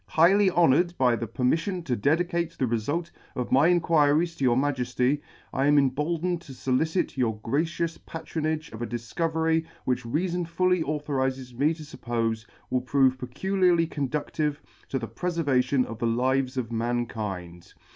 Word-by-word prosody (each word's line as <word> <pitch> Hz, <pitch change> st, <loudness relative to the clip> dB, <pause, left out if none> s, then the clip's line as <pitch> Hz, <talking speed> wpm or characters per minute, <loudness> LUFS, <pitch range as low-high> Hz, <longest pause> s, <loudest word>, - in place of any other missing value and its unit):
Highly 190 Hz, +5 st, +5 dB
honoured 175 Hz, 0 st, +3 dB
by 125 Hz, -2 st, +3 dB
the 115 Hz, 0 st, -4 dB
permiffion 160 Hz, -, -1 dB
to 125 Hz, -, 0 dB
dedi 155 Hz, +11 st, +2 dB
cate 170 Hz, -2 st, -2 dB
the 130 Hz, -, +1 dB
refult 145 Hz, +9 st, -2 dB, 0.2 s
of 125 Hz, -, -3 dB
my 135 Hz, +5 st, +5 dB
Inquiries 165 Hz, -1 st, +3 dB
to 140 Hz, -, -5 dB
your 125 Hz, -2 st, +4 dB
Majelly, 130 Hz, 0 st, 0 dB, 0.3 s
I 135 Hz, +1 st, +1 dB
am 145 Hz, 0 st, +5 dB
emboldened 155 Hz, +6 st, +1 dB
to 140 Hz, -, -11 dB
folicit 135 Hz, +7 st, 0 dB
your 115 Hz, -4 st, 0 dB
gracious 165 Hz, +6 st, -1 dB
pa 165 Hz, -, -8 dB
tronage 155 Hz, -2 st, -3 dB
of 110 Hz, -, -8 dB
a 120 Hz, -, -2 dB
difcovery 160 Hz, +7 st, 0 dB, 0.2 s
which 125 Hz, -1 st, 0 dB
reafon 170 Hz, +8 st, -1 dB
fully 180 Hz, +1 st, +2 dB
authorizes 135 Hz, -4 st, -2 dB
me 145 Hz, +6 st, +1 dB
to 155 Hz, -, -10 dB
fuppofe 115 Hz, -5 st, -3 dB, 0.2 s
will 125 Hz, -, +1 dB
prove 130 Hz, 0 st, +2 dB
peculiarly 175 Hz, +6 st, +1 dB
conducive 150 Hz, 0 st, -2 dB, 0.3 s
to 135 Hz, -, -1 dB
the 115 Hz, -3 st, -4 dB
prefervation 140 Hz, -7 st, +1 dB
of 115 Hz, 0 st, -8 dB
the 115 Hz, -, 0 dB
lives 130 Hz, +3 st, +1 dB
of 120 Hz, -3 st, -2 dB
mankind. 110 Hz, -7 st, -3 dB
140 Hz, 155 wpm, -26 LUFS, 125-165 Hz, 0.3 s, Highly